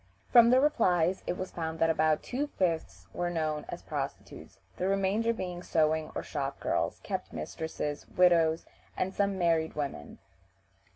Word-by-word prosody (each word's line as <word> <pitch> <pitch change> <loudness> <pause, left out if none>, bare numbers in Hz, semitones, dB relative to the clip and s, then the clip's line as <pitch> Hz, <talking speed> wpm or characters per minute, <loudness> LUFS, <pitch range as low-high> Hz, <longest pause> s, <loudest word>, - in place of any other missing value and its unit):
From 235 -2 +8
the 255 +1 +6
replies 185 - +2
it 180 - -1
was 185 - -5
found 160 -1 -4
that 165 0 +3
about 155 -1 +2
two 280 +4 -2
fifths 175 - -2
were 175 0 -1
known 155 -3 -2
as - - -6
prostitutes, - - -6 0.2
the 185 - -1
remainder 195 +4 +1
being 180 -5 -4
sewing 160 -2 +1
or - - -3
shop 140 -2 -4
girls, - - -1
kept - - -4
mistresses, 150 - -4
widows, 170 -3 +3 0.3
and 190 +1 -1
some 200 -1 0
married 165 -3 +1
women. 140 - -5
170 Hz, 155 wpm, -30 LUFS, 160-190 Hz, 0.3 s, From